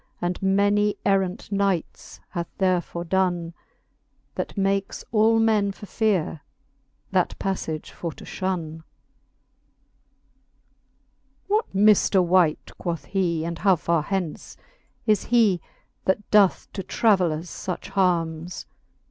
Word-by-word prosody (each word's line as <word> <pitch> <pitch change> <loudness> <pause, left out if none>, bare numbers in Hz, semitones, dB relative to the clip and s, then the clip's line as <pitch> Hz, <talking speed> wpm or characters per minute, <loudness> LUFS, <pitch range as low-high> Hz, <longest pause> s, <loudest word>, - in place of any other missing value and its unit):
And 175 +1 -2
many 205 +2 +2
errant 195 +2 0
knights 195 -4 -2
hath 170 -1 -4
there 185 -2 +2
fordonne; 175 -1 -1 0.8
That - - -5
makes 195 0 -1
all 225 +1 +4
men 215 -3 +2
for 195 +2 -11
feare 195 -8 0 0.7
that - - +1
paflage 160 -5 -3
for 170 - -5
to - - -13
ihonne. 175 -4 -3
V. 160 - -15 2.7
What 425 - 0
mifter 205 -1 +5
wight, 175 -3 +2
quoth 170 -2 -3
he, 175 -4 -1
and 170 -1 -4
how 195 -2 +4
far 165 0 0
hence 180 -1 -4 0.5
Is 215 -2 +2
he, 220 -7 +3 0.4
that 190 +2 0
doth 205 -3 +4
to 195 - -4
travellers 180 -5 +1
fuch 185 - -5
harmes? 175 -3 0
190 Hz, 115 wpm, -24 LUFS, 170-200 Hz, 2.7 s, mifter